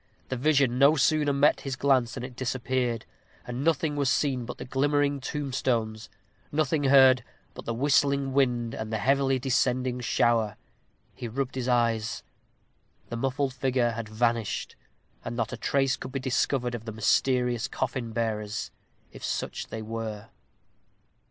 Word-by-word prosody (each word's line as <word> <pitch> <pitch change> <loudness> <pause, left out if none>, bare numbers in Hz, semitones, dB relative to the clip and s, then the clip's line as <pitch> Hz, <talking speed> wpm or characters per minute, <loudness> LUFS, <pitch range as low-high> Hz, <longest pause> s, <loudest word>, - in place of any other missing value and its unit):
The 130 - -1
vision 135 -2 +2
no 140 +3 +6
sooner 150 0 +3
met 140 +2 +3
his 135 -2 -3
glance 130 -3 +2
than 125 - -5
it 125 -1 -7
disappeared, 125 -2 -1 0.4
and 125 +2 -4
nothing 160 -1 +1
was 140 -2 +1
seen 130 -5 +1
but 125 - -7
the - - -7
glimmering 145 +2 +1
tombstones 125 -6 -2 0.4
nothing 150 -1 +1
heard 130 -2 +6 0.3
but - - -10
the 115 - -2
whistling 140 +1 +2
wind 120 -4 +1
and 110 0 -5
the 110 - 0
heavily 135 +3 +2
descending 125 -1 0
shower. 115 -3 +1 0.6
He 120 - -6
rubbed 130 +3 -3
his 130 -1 -3
eyes. 115 -2 +1 0.9
The - - -4
muffled 135 +2 -1
figure 130 -2 +1
had 115 -1 -5
vanished, 115 0 -1 0.5
and 120 - -5
not 115 -2 -2
a - - -4
trace 135 -1 +1
could - - -8
be 135 - -1
discovered 130 -1 0
of 115 -1 -6
the 110 - -4
mysterious 125 +2 +1
coffin 125 -2 -3
bearers, 110 -2 -2 0.4
if - - -12
such - - -3
they 110 - -6
were. 110 -1 -5
125 Hz, 150 wpm, -27 LUFS, 115-135 Hz, 0.9 s, no